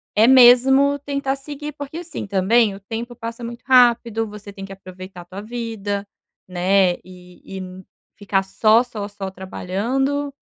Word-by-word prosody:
é 220 +2 +5
mesmo 265 +3 +6
tentar 280 -1 -2
seguir. 295 +2 -7
Porque, 285 +2 -8
assim 345 -2 -6
também, 200 +2 +2
o 195 - -11
tempo 230 +4 -6
passa 230 0 -7
muito 235 0 -7
rápido, 235 -3 +4
você 210 -1 -10
tem 195 -1 -9
que 195 - -9
aproveitar 185 -1 -11
tua 190 +3 -8
vida, 215 -3 -4 0.4
né? 185 0 +2
E 180 +1 -12
e 185 0 -9 0.3
ficar 195 -1 0
só, 220 +4 +3
só, 215 -5 -6
só 200 -2 -7
trabalhando, 255 +10 -2
220 Hz, 150 wpm, -21 LUFS, 195-250 Hz, 0.4 s, mesmo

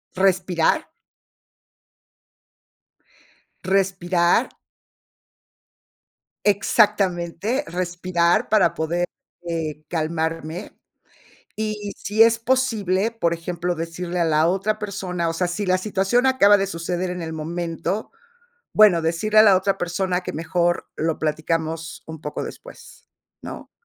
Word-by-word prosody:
respirar. 185 - +2 2.8
Respirar 185 +2 +2 2.0
Exactamente, 205 - +2
respirar 175 -1 0
para 215 -3 +3
poder, 170 +3 -1 0.4
eh, 155 -2 -3
calmarme, 160 +1 -3 0.8
y 210 -2 -3
si 215 +2 +2
es 230 0 +5
posible, 230 -5 +1
por 170 -8 -1
ejemplo, 175 +1 -3
decirle 170 +2 -4
a 170 - +3
la 155 0 +3
otra 195 +4 0
persona, 185 -5 -3
o - - -2
sea, 180 +2 0
si 175 +4 -3
la 185 0 +2
situación 210 +5 +1
acaba 205 -6 +5
de 195 - 0
suceder 175 0 -3
en 180 -1 -4
el 160 0 -5
momento, 170 +5 -3 0.6
bueno, 205 -6 +6
decirle 190 +7 +2
a - - +9
la 200 -3 +7
otra 195 +1 +1
persona 180 +1 -1
que 180 - -6
mejor 175 +2 -1
lo 160 0 -1
platicamos 160 +1 -2
un 160 -1 -8
poco 150 -1 -5
después, - - -12 0.3
¿no? - - -9
180 Hz, 110 wpm, -22 LUFS, 165-200 Hz, 2.8 s, a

